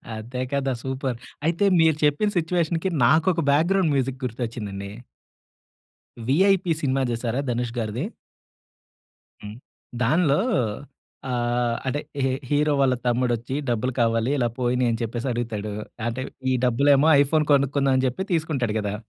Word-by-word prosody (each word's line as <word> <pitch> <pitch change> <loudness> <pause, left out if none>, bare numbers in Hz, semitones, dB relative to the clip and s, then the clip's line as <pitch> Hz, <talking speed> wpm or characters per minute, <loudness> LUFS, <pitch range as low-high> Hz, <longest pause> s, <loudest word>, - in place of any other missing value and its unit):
అదే 120 +4 -5
కదా 140 -1 0
సూపర్. 130 -2 -3 0.3
అయితే 170 +4 +1
మీరు 160 -1 +4
చెప్పిన 150 +8 +2
సిట్యుయేషన్‌కి 170 +1 0 0.2
నాకొక 160 +6 +3
బ్యాక్గ్రౌండ్ 165 +2 +2
మ్యూజిక్ 135 0 -1
గుర్తొచ్చిందండి. 110 -5 -5 1.3
'VIP 180 - +3
cinema' 135 -1 +1
జూశారా 120 +1 -2
ధనుష్‌గారిది? 120 - -2 1.4
హ్మ్. 105 +1 -8 0.5
దానిలో 150 +3 +3 0.9
ఆహ్, 120 -1 0
అదె 145 +3 -1 0.2
హిహి 135 - +2
ఈ - - -1 0.2
హీరో 150 +1 +2
వాళ్ళ 130 -2 +3
తమ్ముడొచ్చి 120 0 0
డబ్బులు 120 +2 0
కావాలి, 115 +1 +2
ఇలా 120 -3 +1
పోయినియి 125 0 +1
అని 115 - -2
చెప్పేసి 115 +2 -3
అడుగుతాడు. 115 -3 -3 0.4
అంటే 120 +2 -3 0.3
ఈ - - +3
డబ్బులేమో 140 +4 +4
ఐఫోన్ 150 +2 +2
కొనుక్కుందాం 140 0 +2
అని 130 - +1
జెప్పి 130 +9 -1
తీసుకుంటాడు 150 -9 -1
గదా! 105 -1 -3
130 Hz, 125 wpm, -24 LUFS, 120-150 Hz, 1.4 s, మీరు